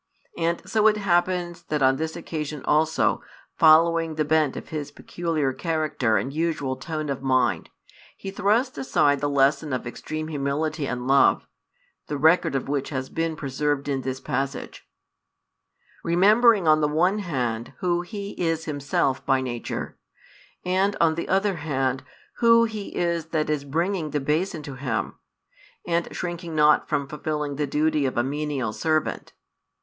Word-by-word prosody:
And 170 0 -2
so 220 -1 +3
it 215 -1 +3
happens 175 -2 0
that 150 -3 -1
on 130 0 +4
this 160 +1 -3
occasion 155 -4 -5
also, 155 +1 +2 0.3
following 165 0 +5
the 155 -1 0
bent 155 -2 +2
of - - -8
his 150 -2 -4
peculiar 155 -2 -2
character 155 -8 0
and 135 - -3
usual 155 -4 -1
tone 155 +1 -4
of 140 -2 -3
mind, 130 -1 +1 0.5
he 195 - -6
thrusts 210 +6 +1
aside 140 +1 +2
the 145 +1 -1
lesson 140 +2 +2
of 130 -1 -2
extreme 155 +6 -5
humility 150 +1 -2
and 125 -1 -4
love, 135 +1 +4 0.6
the 145 - -3
record 160 +1 +3
of 135 - -2
which 140 -1 -2
has 130 -2 -4
been 165 -1 -2
preserved 145 0 -2
in 135 -2 -1
this 130 0 -4
passage, 135 0 -4 1.1
remembering 205 +3 +4
on 155 0 +5
the 150 - +3
one 175 +7 +2
hand 125 - -3
who 175 -1 0
he 200 +2 -6
is 165 -1 -1
himself 140 -3 -1
by 135 -1 +2
nature, 120 -3 -5 0.7
and 190 +2 +1
on 165 -1 +4
the 170 - -4
other 195 0 +1
hand 135 -4 -1 0.3
Who 230 -1 +5
He 220 -3 -3
is 170 -2 0
that 155 -2 -1
is 150 -2 -1
bringing 165 +3 -1
the 145 - -1
bason 155 +3 -1
to 145 - -7
him, 130 -3 -3 0.7
and 170 0 0
shrinking 175 -2 -5
not 150 0 +4
from 140 -1 0
fulfilling 150 -1 -3
the 150 -1 -1
duty 150 -1 +1
of 130 - -4
a 120 - +3
menial 140 -4 -2
servant. 155 +2 -1
155 Hz, 155 wpm, -24 LUFS, 140-170 Hz, 1.1 s, following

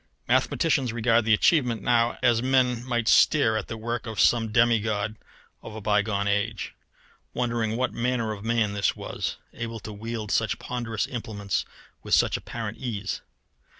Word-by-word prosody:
Mathematicians 140 -7 +2
regard 115 0 +2
the 110 - +4
achievement 120 - +2
now 120 -1 +2
as 120 -2 +4
men 125 -2 +2
might 120 -3 -1
stare 120 -5 +5
at 110 - -2
the 115 - -5
work 115 +1 -4
of 110 -4 -5
some 115 0 +3
demigod 110 -2 +2 0.5
of 110 - -9
a - - -5
bygone 105 -1 +1
age, 105 +1 -1 0.6
wondering 115 -2 -1
what 130 +1 0
manner 115 -2 -1
of 105 -2 -7
man 115 -2 +1
this 100 -1 +1
was, - - -4 0.2
able 115 -1 -5
to 105 - -7
wield 110 0 -5
such 110 -2 +1
ponderous 120 -3 -3
implements 110 - -3 0.4
with - - +2
such - - +3
apparent 110 -2 -5
ease. 105 -6 -4
115 Hz, 155 wpm, -26 LUFS, 110-120 Hz, 0.6 s, stare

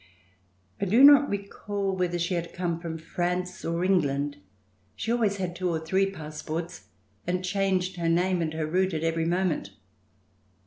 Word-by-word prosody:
I - - +2
do 225 +8 +5
not 285 0 +8
recall 200 -1 -3
whether 180 -1 0
she 175 +2 -1
had 170 -1 -3
come 175 -2 -1
from 165 -1 -5
France 180 +2 -3
or 170 +1 -1
England. 145 -6 +1 0.6
She 225 - -3
always 220 -4 +1
had 180 -2 -3
two 185 0 -1
or 165 -2 0
three 190 +5 +1
passports 160 0 -6 0.4
and 180 +1 -1
changed 185 -1 0
her 170 -1 0
name 180 +1 +2
and 160 -1 -1
her 160 -1 -1
route 185 +3 +1
at 155 - -2
every 165 0 0
moment. 175 - 0
180 Hz, 165 wpm, -27 LUFS, 165-190 Hz, 0.6 s, not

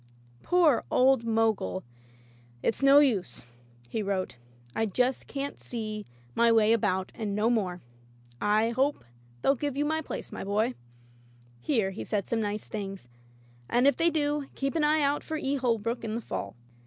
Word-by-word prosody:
Poor 335 -8 +3
old 260 -1 +4
Mogul! 225 -4 +1 0.8
"It's 225 - 0
no 275 +1 +7
use," 205 - +2 0.4
he 215 - -2
wrote, 195 -6 -2 0.2
" 120 +1 -28
I 225 - +1
can 195 - -9
just 250 +1 0 0.3
see 215 -3 -5 0.3
my 235 - +4
way 225 -1 +5
about 190 -4 0
and 210 -3 -3
no 215 +3 +2
more. 185 -6 -1 0.6
I 215 +2 +3
hope 270 - 0 0.4
they'll 275 - +5
give 280 0 -3
you 290 - +1
my 315 +1 0
place, - - -6
my - - -5
boy" 215 +5 0 0.5
— 120 0 -29
here 220 -9 +2
he 195 - -6
said 205 -3 -1
some 230 -1 -1
nice 210 0 -3
things 195 - -6 0.3
— 120 0 -29
"and 245 +2 +3
if 280 -2 +5
they 335 +4 +3
do, 295 -2 0
keep 275 0 -1
an 320 - +1
eye 300 0 +3
out 285 +1 +1
for 315 - -3
E. 280 -1 -1
Holbrook 235 -2 -1
in 220 -1 -3
the 235 - -3
fall. 100 - -5
225 Hz, 180 wpm, -28 LUFS, 200-275 Hz, 0.8 s, no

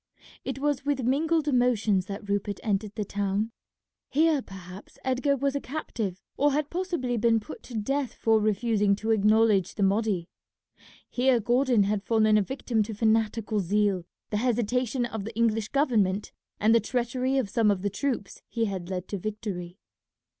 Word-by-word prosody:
It 265 -1 -4
was 290 -1 0
with 285 -2 0
mingled 310 +5 +1
emotions 225 -8 +2
that 200 0 -6
Rupert 200 0 -1
entered 210 0 -1
the 215 -2 -2
town. 205 +3 -1 0.6
Here 310 0 +3
perhaps 190 -2 -11
Edgar 260 +2 +1
was 275 +1 0
a 280 - -1
captive, 225 - -4
or 290 0 +3
had 295 +1 -1
possibly 340 -9 -1
been 225 0 +3
put 210 - -10
to 245 - -10
death 270 +5 -1
for 225 -1 +3
refusing 210 -1 +2
to 220 +2 -2
acknowledge 215 -2 +3
the 205 - 0
Mahdi. 195 -3 +1 0.8
Here 250 0 +2
Gordon 240 0 +3
had 205 0 0
fallen 215 0 +3
a 210 - +5
victim 235 0 -1
to 215 +1 -3
fanatical 220 0 +1
zeal, 200 0 +1 0.3
the 210 - 0
hesitation 245 +1 0
of 220 -3 -5
the 220 +2 -7
English 225 -2 +1
government, 215 -9 +1 0.3
and 220 +2 +4
the 230 - +6
treachery 250 +3 -1
of 260 -6 +1
some 225 -3 +3
of 200 -2 0
the 205 - 0
troops 245 -2 -3
he 230 -1 0
had 190 -4 -4
led 185 -1 -4
to 200 - -3
victory. 195 -4 -5
220 Hz, 170 wpm, -27 LUFS, 205-255 Hz, 0.8 s, the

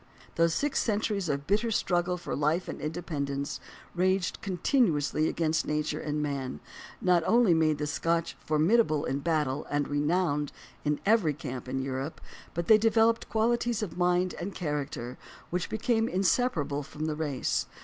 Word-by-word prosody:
Those 165 0 +2
six 290 -1 0
centuries 205 -4 0
of 140 -1 -1
bitter 210 +6 +1
struggle 180 -4 +1
for 175 - -4
life 155 +5 +1
and - - -6
in 155 - -2
dependence, 140 -4 -3 0.4
waged 185 +1 +1
continuously 170 - +1
against 160 -1 0
nature 150 0 -1
and 150 0 -2
man, 135 - -3 0.4
not 180 -2 +3
only 230 -6 +5
made 155 -2 +3
the 150 - -2
Scotch 165 +3 -1
formidable 155 +1 +3
in 135 - -1
battle 150 -2 0
and 145 0 0
renowned 150 0 0 0.3
in 150 0 0
every 200 -9 +3
camp 125 -3 -6
in 130 0 -1
Europe, 135 +3 -4 0.4
but 170 0 -1
they 215 +3 +7
developed 225 +1 +3
qualities 230 +1 +1
of 195 - -5
mind 180 0 +2
and 195 +3 -5
character 145 -6 -4 0.3
which 180 +1 -1
became 225 0 +1
insep 195 +7 +2
arable 145 -2 -2
from 150 +2 -6
the 155 -1 -1
race. 150 -4 -1
165 Hz, 160 wpm, -29 LUFS, 145-195 Hz, 0.4 s, they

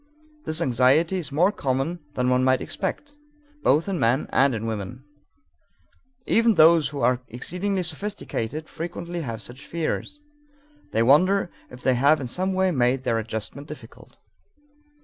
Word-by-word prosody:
This 155 +2 0
anxiety 135 +9 +3
is 165 - -5
more 175 +8 +3
common 135 0 -2 0.2
than 125 0 0
one 125 0 +3
might 130 0 +3
expect, 290 +9 -4 0.5
both 155 - +3
in 190 -4 -2
men 120 +5 +2
and 135 -1 +3
in 110 0 -4
women. 115 +3 -5 1.2
Even 230 -1 +3
those 160 -1 +6
who 145 -2 -5
are 125 +1 +2
exceedingly 180 - -2
sophisticated 160 - -4
frequently 170 +1 -5
have 115 -6 -5
such 125 +3 -6
fears. 170 - -3 0.7
They 115 - +2
wonder 180 +9 +4 0.2
if 125 0 -13
they 130 - +3
have 140 +5 +4
in 135 - -4
some 185 +9 -1
way 190 0 +2
made 130 -2 +1
their 115 -2 +1
adjustment 110 +6 -6
difficult. 150 - -12
145 Hz, 150 wpm, -24 LUFS, 125-175 Hz, 1.2 s, those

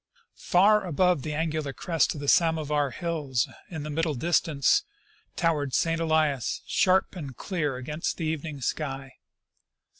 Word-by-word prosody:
Far 205 +4 +4
above 180 -2 +2
the 150 +2 -4
angular 155 -3 -2
crest 165 +1 0
of 145 - -6
the 145 - -5
Samovar 150 -3 +2
hills 145 -5 -2 0.2
in 160 -4 -5
the 150 - -5
middle 160 0 0
distance 155 -1 +2 0.5
towered 150 -6 0
St. 165 0 +1
Elias, 155 -5 +1
sharp 190 +1 +2
and 140 -7 -7
clear 155 -8 -2
against 150 +5 -3
the 165 - -3
evening 155 -2 -4
sky. 135 -1 -3
155 Hz, 140 wpm, -27 LUFS, 140-165 Hz, 0.5 s, Far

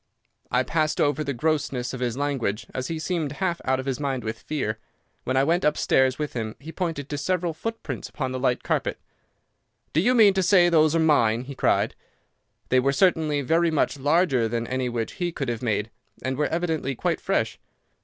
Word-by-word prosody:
"I 125 +2 +2
passed 155 +2 0
over 145 +1 +2
the 140 - -2
grossness 135 -3 -1
of 130 - -5
his 125 -1 -2
language, 125 -7 -1
as 130 - -3
he 165 - -3
seemed 155 -3 -2
half 175 +1 -2
out 130 0 +1
of 130 - -5
his 135 -1 -2
mind 135 -3 -2
with 110 0 -4
fear. 110 -8 -3 0.5
When 130 +1 0
I 135 - +4
went 170 +5 +2
upstairs 130 -3 +2
with 150 -1 -3
him 110 -3 -4
he 155 +5 -9
pointed 165 -6 -3
to 145 -1 -4
several 175 +2 0
footprints 225 +8 -5
upon 130 -6 -3
the 130 - -3
light 125 -1 0
carpet. - - -1 1.0
"'D'you 210 - +3
mean 210 -4 +7
to 190 - +1
say 180 -1 +5
those 155 -1 +4
are - - +3
mine?' 120 -8 +3
he 140 +2 -8
cried. - - +1 0.8
"They 130 - +4
were 135 +2 +2
certainly 155 -2 +2
very 165 +5 +2
much 150 -2 0
larger 145 -4 +2
than 115 +1 -2
any 130 0 -2
which 115 -2 -3
he 175 -1 0
could 140 -5 -3
have 115 -2 -3
made, 110 -2 -1 0.3
and 130 0 -1
were 150 +2 +1
evidently 160 -5 -1
quite - - -1
fresh. - - -1
145 Hz, 200 wpm, -25 LUFS, 125-165 Hz, 1.0 s, mean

